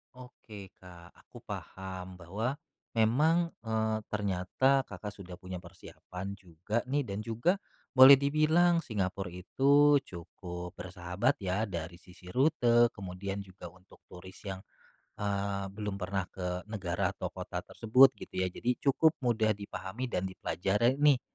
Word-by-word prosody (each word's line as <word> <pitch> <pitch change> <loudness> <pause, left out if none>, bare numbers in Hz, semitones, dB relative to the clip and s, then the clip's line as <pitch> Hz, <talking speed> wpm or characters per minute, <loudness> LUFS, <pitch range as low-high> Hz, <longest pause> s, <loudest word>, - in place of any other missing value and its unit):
Oke, 110 -5 -11
Kak, 90 -2 -14
aku - - -15
paham 95 -1 -8
bahwa 110 - -3 0.3
memang, 150 +10 +3 0.2
eee, 110 -1 0
ternyata 105 +7 +1
Kakak 105 - -9
sudah 90 -3 -10
punya 90 0 -7
persiapan 90 +2 -9
juga 95 +5 -4
nih, 145 -1 0
dan 100 +2 -4
juga 115 - +1 0.4
boleh 130 +1 +10
dibilang 160 +4 +3
Singapura 95 -5 -3
itu 140 +11 +4
cukup 90 0 -8
bersahabat 90 +8 -1
ya 95 +2 -1
dari 85 -5 -5
sisi 90 +1 -17
rute, 120 - +3
kemudian 95 +1 -5
juga 95 -3 -10
untuk 95 +1 -21
turis 95 +1 -11
yang, 95 -2 -5 0.6
eee, 100 -1 -1
belum 105 +1 -4
pernah 95 +1 -1
ke 90 -1 -4
negara 90 -2 -1
atau - - -4
kota - - -5
tersebut, 125 +4 +5
gitu - - -11
ya. 95 - +1
Jadi 120 +7 -2
cukup 150 +3 +4
mudah 110 -3 +2
dipahami 100 +4 -6
dan 95 -5 -1
dipelajari 100 +6 0
nih 145 -3 +4
100 Hz, 135 wpm, -31 LUFS, 90-125 Hz, 0.6 s, boleh